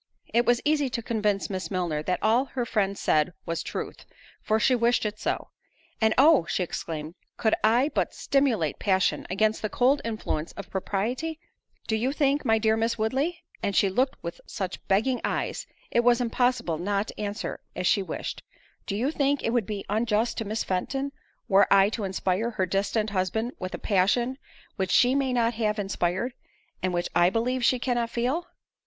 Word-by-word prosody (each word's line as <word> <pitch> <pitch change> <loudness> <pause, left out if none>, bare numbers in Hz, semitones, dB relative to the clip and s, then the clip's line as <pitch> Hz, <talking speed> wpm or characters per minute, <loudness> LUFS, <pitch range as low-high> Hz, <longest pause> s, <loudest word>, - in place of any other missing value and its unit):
It 235 +1 +3
was 240 0 +4
easy 295 -2 +2
to 235 -1 -3
convince 210 -3 0
Miss 185 -4 -4
Milner 175 -5 -1
that 180 +4 -1
all 230 +5 +3
her 255 -3 -3
friend 200 -3 0
said 155 +3 +2
was 165 0 -2
truth, - - -6 0.3
for 220 +1 +1
she 255 - +3
wished 235 -1 +2
it 210 0 -3
so. - - -2 0.5
"And 220 0 +3
oh!" 280 - +6
she 185 - 0
exclaimed, 160 -2 -5 0.2
"could 220 - +2
I 240 +6 +4
but - - 0
stimulate 240 - +1
passion, 190 -2 +1
against 215 +4 +1
the 215 - -1
cold 260 +6 +3
influence 215 -8 -3
of 200 - -9
propriety;—Do 245 - -4
you 250 +5 0
think, 285 0 +1
my 225 0 +3
dear 220 0 +2
Miss 225 +1 0
Woodley," 270 +11 -1 0.2
(and 200 - -1
she 195 - +4
looked 255 +8 +1
with 170 0 -6
such 190 -2 -5
begging 225 +6 +2
eyes, - - -2 0.2
it - - +3
was 240 0 +4
impossible 245 -8 0
not 200 +3 -1
to - - -7
answer 205 +1 -4 0.2
as 180 - -3
she 200 - +3
wished,) 190 - -5 0.5
"do 200 - -2
you 250 +8 0
think 285 -2 +1
it 230 - +1
would 235 -5 +1
be 205 -2 -4
unjust 220 +1 +1
to 225 - -3
Miss 215 +2 -2
Fenton, 270 +10 -2 0.4
were 200 -2 +4
I 195 0 +6
to 215 -1 -3
inspire 190 +3 0
her 205 -5 -1
destined 200 +3 0
husband 205 +5 -1
with 185 -1 -4
a - - -5
passion 235 +7 +1 0.4
which 190 -1 -1
she 245 +6 +5
may 270 -1 +1
not 235 -1 +2
have 215 -1 0
inspired, 195 +3 -1 0.5
and 185 - 0
which 175 0 -1
I 175 0 +5
believe 245 +4 0
she 255 - +4
cannot 240 -2 -1
feel?" 260 +10 -1
220 Hz, 185 wpm, -26 LUFS, 195-245 Hz, 0.5 s, oh